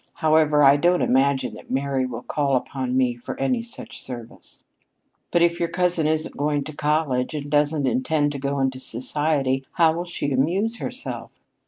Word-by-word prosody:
However, 155 Hz, -1 st, +3 dB
I 140 Hz, +1 st, +7 dB
don't 175 Hz, +4 st, +3 dB
imagine 135 Hz, +1 st, +2 dB
that -, -, -12 dB
Mary 135 Hz, -1 st, 0 dB
will 120 Hz, -1 st, -7 dB
call 140 Hz, -1 st, 0 dB
upon 130 Hz, 0 st, -2 dB
me 125 Hz, -2 st, +2 dB
for 120 Hz, 0 st, -8 dB
any 230 Hz, -, +1 dB
such 230 Hz, -, -8 dB
service." 120 Hz, -3 st, -10 dB, 0.7 s
"But 170 Hz, -, +3 dB
if 170 Hz, 0 st, +2 dB
your 170 Hz, -, 0 dB
cousin 175 Hz, -2 st, +1 dB
isn't 155 Hz, 0 st, -1 dB
going 145 Hz, 0 st, 0 dB
to 155 Hz, +1 st, -8 dB
college, 150 Hz, -3 st, 0 dB
and 145 Hz, -1 st, -5 dB
doesn't 145 Hz, 0 st, +2 dB
intend 160 Hz, -, +1 dB
to 140 Hz, -, -5 dB
go 140 Hz, +1 st, -2 dB
into 135 Hz, -1 st, 0 dB
society, 135 Hz, +1 st, -1 dB
how 165 Hz, -2 st, +4 dB
will 170 Hz, +2 st, -3 dB
she 170 Hz, -5 st, -3 dB
amuse 185 Hz, -, +1 dB
herself?" -, -, -6 dB
145 Hz, 175 wpm, -23 LUFS, 135-160 Hz, 0.7 s, I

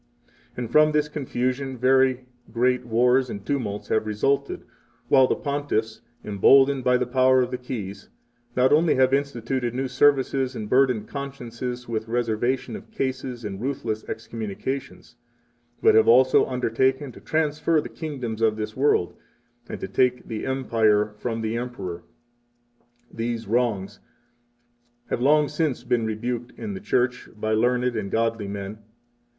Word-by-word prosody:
And 120 Hz, -2 st, -4 dB
from 155 Hz, +2 st, +5 dB
this 150 Hz, 0 st, +2 dB
confusion 130 Hz, -2 st, -3 dB
very 130 Hz, 0 st, +3 dB, 0.3 s
great 125 Hz, +2 st, +1 dB
wars 125 Hz, +3 st, +3 dB
and 100 Hz, -2 st, -7 dB
tumults 115 Hz, -8 st, -3 dB
have 110 Hz, 0 st, +1 dB
resulted, 135 Hz, +7 st, 0 dB, 0.5 s
while 130 Hz, -1 st, +6 dB
the -, -, +1 dB
Pontiffs, 140 Hz, -7 st, -2 dB, 0.2 s
emboldened 135 Hz, +6 st, +4 dB
by 125 Hz, 0 st, +4 dB
the 125 Hz, -, -1 dB
power 130 Hz, +1 st, +4 dB
of 125 Hz, -, -4 dB
the 125 Hz, -, -3 dB
Keys, 105 Hz, -6 st, -7 dB, 0.5 s
not 130 Hz, +2 st, +4 dB
only 160 Hz, +2 st, +4 dB
have 130 Hz, 0 st, +3 dB
instituted 130 Hz, -3 st, -1 dB
new 135 Hz, +1 st, -1 dB
services 130 Hz, -1 st, +2 dB
and 105 Hz, -, -5 dB
burdened 125 Hz, -3 st, +2 dB
consciences 125 Hz, -3 st, -6 dB
with 110 Hz, -1 st, -3 dB
reservation 120 Hz, +2 st, -1 dB
of -, -, -10 dB
cases 130 Hz, -3 st, -4 dB
and 100 Hz, -1 st, -5 dB
ruthless 125 Hz, -5 st, -3 dB
excommunications, 115 Hz, +3 st, -6 dB, 0.7 s
but -, -, +6 dB
have 110 Hz, -, +5 dB
also 130 Hz, +3 st, +5 dB
undertaken 130 Hz, +2 st, 0 dB
to 100 Hz, -, -14 dB
transfer 155 Hz, +5 st, +1 dB
the -, -, -4 dB
kingdoms 125 Hz, -8 st, -5 dB
of 110 Hz, -1 st, +3 dB
this 110 Hz, 0 st, -5 dB
world, 130 Hz, -10 st, +2 dB, 0.5 s
3 -, -, -8 dB
and -, -, -11 dB
to -, -, -3 dB
take 125 Hz, +2 st, +1 dB
the 110 Hz, +2 st, -4 dB
Empire 110 Hz, -5 st, +1 dB
from 115 Hz, -2 st, -3 dB
the 110 Hz, +1 st, -2 dB
Emperor. 100 Hz, -8 st, -5 dB, 1.1 s
These 115 Hz, -1 st, -3 dB
wrongs 110 Hz, -4 st, -1 dB, 1.1 s
have -, -, -1 dB
long 150 Hz, +3 st, +4 dB
since 145 Hz, -3 st, -1 dB
been 120 Hz, -2 st, 0 dB
rebuked 120 Hz, +2 st, -4 dB
in 210 Hz, -, -5 dB
the 190 Hz, -, -6 dB
Church 125 Hz, -10 st, 0 dB
4 -, -, -18 dB
by 110 Hz, +1 st, -2 dB
learned 125 Hz, +2 st, +1 dB
and 100 Hz, -2 st, -3 dB
godly 115 Hz, -1 st, -1 dB
men. 100 Hz, +1 st, -6 dB
125 Hz, 150 wpm, -24 LUFS, 110-135 Hz, 1.1 s, while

